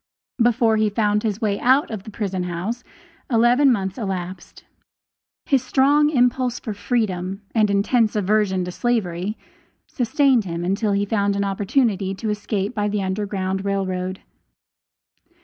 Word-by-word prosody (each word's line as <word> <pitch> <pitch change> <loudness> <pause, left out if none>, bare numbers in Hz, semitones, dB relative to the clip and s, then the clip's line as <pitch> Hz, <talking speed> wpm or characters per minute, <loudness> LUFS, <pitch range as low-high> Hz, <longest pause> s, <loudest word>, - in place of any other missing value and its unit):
Before 230 -1 +3
he 215 0 +2
found 210 0 +1
his 215 0 -2
way 205 -2 0
out 260 +2 +3
of 215 -3 -4
the 215 - -10
prison 195 -4 -3
house 185 +8 -4 0.5
eleven 245 +3 +4
months 195 -2 -2
elapsed. 185 -3 -6 0.8
His 270 -3 +2
strong 290 +3 +3
impulse 250 -3 +1
for 220 - -5
freedom, 200 -4 -2
and 215 -2 +3
intense 215 +3 +2
aversion 205 -2 +1
to 180 - -5
slavery, 205 -3 -1 0.5
sustained 255 -2 +2
him 170 -1 -4
until 200 +3 0
he 200 +1 +1
found 200 -1 0
an 200 - 0
opportunity 200 -1 0
to 215 +2 -3
escape 205 0 -2
by 210 -3 -1
the 205 -1 -1
Underground 190 -1 -2
Rail 200 -1 0
Road. 185 0 -4
210 Hz, 145 wpm, -22 LUFS, 190-235 Hz, 0.8 s, eleven